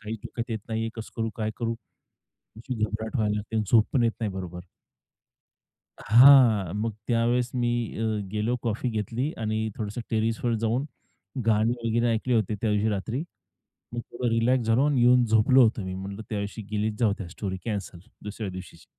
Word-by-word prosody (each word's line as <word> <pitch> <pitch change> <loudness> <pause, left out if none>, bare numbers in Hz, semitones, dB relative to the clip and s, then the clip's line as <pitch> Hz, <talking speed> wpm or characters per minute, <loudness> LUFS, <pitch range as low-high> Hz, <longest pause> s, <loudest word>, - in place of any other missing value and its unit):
काही 110 +1 -4
डोक्यात 120 +1 -6
येत 110 - -1
नाहीये, 115 0 -1
कसं 115 -1 -8
करू, 115 -1 -1
काय 110 -1 -1
करू! 115 -1 -1 0.8
अशी 125 +3 -5
घाबरहट 110 +3 -3
व्हायला 105 -4 +1
लागते 105 +2 -5
आणि 110 - +2
झोप 110 -2 +5
पण 125 -4 +3
येत 115 - +3
नाही 110 -4 -1
बरोबर. 90 -2 -6 1.4
हां, 120 -7 +7
मग 110 +1 -1 0.2
त्यावेळेस 120 +1 +1
मी 120 -1 +1 0.3
अ, 115 - -1 0.3
गेलो 110 +4 0
कॉफी 115 +1 -1
घेतली 115 +6 -2
आणि 110 0 -1
थोडसं 105 +2 -4
टेरेसवर 115 +1 0
जाऊन, 120 +5 +1 0.6
गाणी 110 +1 +3
वगैरे 115 +1 +2
ऐकली 120 +2 0
होती 110 -1 +1
त्यावशी 105 0 +1
रात्री. 110 +6 -2 0.7
मग 120 - -3
थोडं 120 +1 -2
रिलॅक्स 115 +1 +2
झालो 115 +5 +3
आणि 145 -4 +2
येऊन 125 +1 +5
झोपलो 110 +4 +5
होतो 115 -2 +2
मी 95 - -4
म्हटलं 100 +3 -6
त्यावेळी 105 +1 -4
गेलीत 105 +1 0
जाऊ 115 -4 +3
त्या 95 - -6
स्टोरी 95 +1 -5
कॅन्सल 100 -5 -4 0.3
दुसऱ्या 105 -1 -5
दिवशीची. 90 -1 -10
110 Hz, 170 wpm, -26 LUFS, 105-120 Hz, 1.4 s, हां